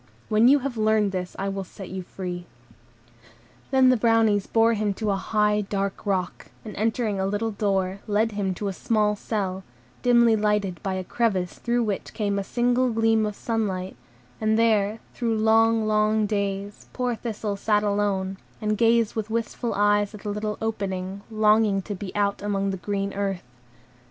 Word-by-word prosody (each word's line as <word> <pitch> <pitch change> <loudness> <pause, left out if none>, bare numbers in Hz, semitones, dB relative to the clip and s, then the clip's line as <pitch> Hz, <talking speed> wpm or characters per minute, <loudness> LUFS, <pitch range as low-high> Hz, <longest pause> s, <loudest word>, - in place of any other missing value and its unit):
When 215 +2 +5
you 280 +3 +7
have 255 -4 -3
learned 215 -2 +2
this, 180 -1 -4
I 195 - -2
will 195 0 -3
set 190 +1 -10
you 190 0 -4
free." 180 -1 -6 1.2
Then 265 -1 +5
the 255 - +5
Brownies 225 -3 +3
bore 230 0 +3
him 210 -2 -1
to 215 -1 -1
a - - +1
high, 210 +1 +1
dark 200 0 -3
rock, 185 -3 -2 0.2
and, 210 - -7
entering 220 -1 0
a 190 - 0
little 205 +3 -1
door, 195 -2 -1
led 215 +2 +1
him 200 -3 -2
to 205 - -3
a 195 - -2
small 210 -1 +1
cell, 195 -3 -3 0.4
dimly 235 -2 +5
lighted 210 -4 0
by 190 -1 -2
a 185 - -3
crevice 190 -3 -1
through 240 0 0
which 205 -3 -3
came 200 -2 0
a - - -2
single 245 +4 +1
gleam 225 -1 +2
of 210 - -5
sunlight; 195 -6 -2 0.5
and 220 0 +2
there, 220 -2 +2
through 230 -2 -1
long, 225 0 +3
long 215 0 +2
days, 200 -1 -3
poor 250 -1 -1
Thistle 215 -2 -4
sat 210 +1 +1
alone, 200 -2 0 0.2
and 215 -1 -1
gazed 230 -1 +3
with 220 -1 -3
wistful 230 +1 -2
eyes 205 0 +2
at 205 - -11
the 210 - -5
little 210 +1 -3
opening, 195 -3 -3
longing 215 -2 +3
to 205 - -5
be 190 -1 -6
out 200 -1 0
on 200 -1 -1
the 190 - -3
green 195 +2 -3
earth. 195 -2 -2
210 Hz, 175 wpm, -25 LUFS, 195-225 Hz, 1.2 s, you